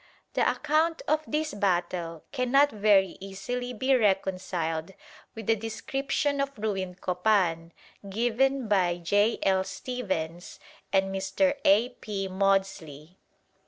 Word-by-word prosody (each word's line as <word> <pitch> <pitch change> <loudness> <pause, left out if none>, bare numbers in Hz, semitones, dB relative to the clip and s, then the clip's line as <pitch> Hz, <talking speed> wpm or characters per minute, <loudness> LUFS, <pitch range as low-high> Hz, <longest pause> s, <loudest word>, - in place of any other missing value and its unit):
The - - +2
account 320 +2 +1
of 310 +1 +2
this 305 -1 -1
battle 175 -4 -1
cannot 275 +2 +3
very 200 -3 +3
easily 220 +6 -5
be 260 +3 +1
reconciled 185 -5 0 0.4
with 225 -2 -7
the 225 - +3
description 275 +6 -2
of 275 -2 -3
ruined 190 -4 -3
Copan 180 -3 +1 0.4
given 245 +4 +1
by 180 -4 +2
J. 205 +6 +2
L. 190 -1 +3
Stephens 190 -9 -4 0.3
and 195 0 +2
Mr. 195 +9 +1
A. 215 +5 +5
P. 205 -5 -5
Maudslay. 190 -5 -1
200 Hz, 115 wpm, -27 LUFS, 185-250 Hz, 0.4 s, A